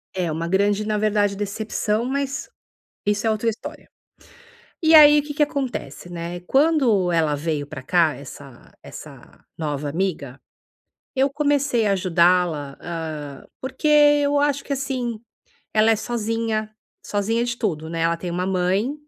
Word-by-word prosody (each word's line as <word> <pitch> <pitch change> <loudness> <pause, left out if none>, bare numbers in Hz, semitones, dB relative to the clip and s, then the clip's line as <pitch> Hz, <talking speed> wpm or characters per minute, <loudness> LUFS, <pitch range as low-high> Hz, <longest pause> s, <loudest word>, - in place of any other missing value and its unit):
É, 175 -3 -1
uma 165 +2 -3
grande, 200 +3 +1
na 215 -1 0
verdade, 205 -1 +1
decepção, 210 +2 -2
mas 275 - -3 0.6
isso 205 +2 0
é - - +3
outra 220 +1 0
história. 225 - -6 0.9
E 320 0 +5
aí 295 -1 +8
o - - -6
que 295 0 -6
que 295 - +1
acontece, 270 -10 -3
né? 170 +1 -5
Quando 250 - +2
ela 155 -3 +1
veio 150 -1 -2
pra 145 -4 -8
cá, 165 -3 +3
essa 140 -2 -12
essa - - -13
nova 150 -2 -3
amiga, 155 -6 -3 0.7
eu 270 +1 +3
comecei 285 -5 +1
a 200 - +3
ajudá-la, 175 -5 +1
hã, 155 -5 -6 0.2
porque 260 +3 -5
eu 290 -1 +5
acho 285 -1 0
que - - -4
assim, 255 -5 -3 0.5
ela 215 +1 +4
é - - +4
sozinha, 225 -1 -2 0.4
sozinha 225 +4 0
de 240 0 -3
tudo, 160 -8 -2
né. 165 0 -3
Ela 165 0 +1
tem 175 +1 -5
uma 180 +2 -2
mãe 190 +7 0
205 Hz, 150 wpm, -22 LUFS, 170-255 Hz, 0.9 s, aí